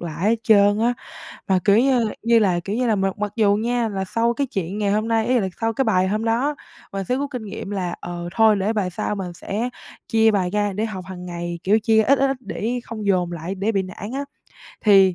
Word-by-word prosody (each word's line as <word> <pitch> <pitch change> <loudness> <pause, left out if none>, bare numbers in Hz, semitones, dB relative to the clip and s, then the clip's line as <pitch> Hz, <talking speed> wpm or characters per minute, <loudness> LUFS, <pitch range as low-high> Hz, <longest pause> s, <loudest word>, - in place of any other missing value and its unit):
lại 170 -1 -6
hết 230 - +3
trơn 205 -3 +5
á. 240 +2 +2 0.5
Mà 190 -1 +4
kiểu 205 +1 +5
như 250 -3 +3 0.2
như 230 0 +4
là 185 -5 +2
kiểu 200 +5 -4
như 250 +1 +1
là 225 - +3
mặc 195 +1 -1
mặc 205 -1 -2
dù 205 -3 +4
nha, 235 +1 0
là 195 -2 -3
sau 230 +5 +1
cái 280 +2 -1
chuyện 195 -2 -4
ngày 205 -1 +1
hôm 215 +2 0
nay 225 -1 +1
ý 250 0 +3
là 195 - 0
sau 225 0 +1
cái 270 +4 0
bài 185 -3 +2
hôm 215 +3 -1
đó, 245 +6 +1 0.4
mình 195 0 -3
sẽ 250 +6 0
rút 280 +1 -3
kinh 250 -5 -5
nghiệm 200 -1 -6
là, 180 -3 -2
ờ, 175 0 -6
thôi 220 -2 +5
để 200 +3 0
bài 205 -5 -1
sau 180 - -2
mình 190 -3 -5
sẽ 210 +7 -3 0.4
chia 225 0 +4
bài 190 -4 0
ra 205 0 0
để 210 +3 -2
học 190 -5 -5
hàng 180 -1 -8
ngày. 175 -1 -5
Kiểu 210 +4 +3
chia 220 0 +4
ít, 275 +5 +3
ít, 275 0 +2
ít 270 - -1
để 245 0 -3
không 215 -3 -6
dồn 180 -3 +1
lại 170 +3 -4
để 200 +4 -1
bị 195 -2 +1
nản 190 +4 -8
á. 280 +2 -3 0.6
Thì 195 -3 +5
210 Hz, 255 wpm, -22 LUFS, 190-230 Hz, 0.6 s, trơn